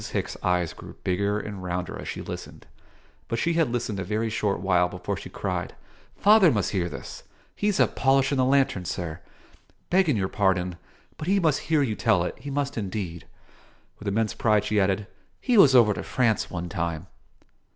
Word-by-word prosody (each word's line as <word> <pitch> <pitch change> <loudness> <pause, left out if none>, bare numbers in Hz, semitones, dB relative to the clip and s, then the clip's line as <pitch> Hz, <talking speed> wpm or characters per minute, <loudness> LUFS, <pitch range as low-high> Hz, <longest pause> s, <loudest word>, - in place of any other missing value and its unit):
Hicks' - - -3
eyes 90 -2 0
grew - - -11
bigger 100 +3 0
and 100 -3 -7
rounder 90 0 -3
as - - -7
she - - -5
listened; - - -8 0.6
but 115 - -2
she 170 +8 +1
had 165 -5 +2
listened 115 -4 -2
a - - -2
very 110 +4 -1
short 105 -3 0
while 90 -1 +2
before 90 0 -4
she - - -8
cried - - -4 0.4
"Father 205 -5 +6
must 105 -7 0
hear 90 -3 -1
this! 70 -4 -8 0.3
He's 205 -1 0
up - - +3
polishin' 135 0 +2
the 130 - +4
lantern, 130 -9 +2
sir. 85 -3 -4 0.7
Begging 175 - +3
your 95 -2 0
pardon, 90 -3 0 0.4
but 155 - -5
he 200 +2 +3
must 160 -6 +2
hear 155 -3 +4
you 115 -5 -1
tell 90 -4 +2
it; 90 - -3
he 140 - -7
must 140 -2 -2
indeed." 95 -4 -5 0.7
With 105 - -8
immense 110 +2 0
pride 105 -2 +2
she 105 0 +1
added, 100 +1 +1 0.3
"He 250 - +1
was 145 -11 +7
over 110 -4 +6
to - - -5
France, 120 -4 0
one 90 -1 -4
time." 85 -1 -3
105 Hz, 185 wpm, -26 LUFS, 90-135 Hz, 0.7 s, was